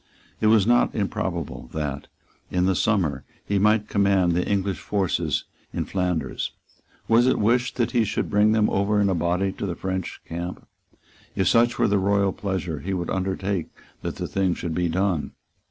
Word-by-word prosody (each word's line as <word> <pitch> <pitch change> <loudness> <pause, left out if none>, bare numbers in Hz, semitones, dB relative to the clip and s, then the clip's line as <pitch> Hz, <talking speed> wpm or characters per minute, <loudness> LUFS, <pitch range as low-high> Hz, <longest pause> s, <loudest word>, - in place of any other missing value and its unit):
It 110 - +2
was 110 -3 +5
not 120 +1 +3
improbable 85 - -3
that, 75 -2 -3 0.4
in 90 0 +1
the 95 - +3
summer, 85 -10 +1 0.2
he 100 -1 +1
might 105 +1 +3
command 100 -3 +3
the 90 +1 +1
English 100 -1 0
forces 100 -3 0 0.3
in - - -2
Flanders. 90 -4 -2 0.5
Was 115 +2 +5
it 130 - +3
wished 120 +4 +2
that 120 -2 0
he 120 -2 +3
should 110 - -1
bring 105 +1 +3
them 110 -1 +3
over 100 +2 +2
in 100 -1 +3
a - - +2
body 90 +3 0
to 100 - -5
the 90 - -3
French 95 -1 -4
camp? 85 +2 -6 0.7
If 95 - +1
such 120 +1 +3
were 120 - +3
the 100 0 +2
royal 100 0 +2
pleasure, 95 -6 -3
he 95 +5 -3
would 85 -2 -3
undertake 95 -1 -1 0.3
that - - -4
the - - -4
thing 95 -2 0
should 85 -2 -4
be 85 +1 0
done. 90 -5 0
95 Hz, 180 wpm, -24 LUFS, 90-105 Hz, 0.7 s, was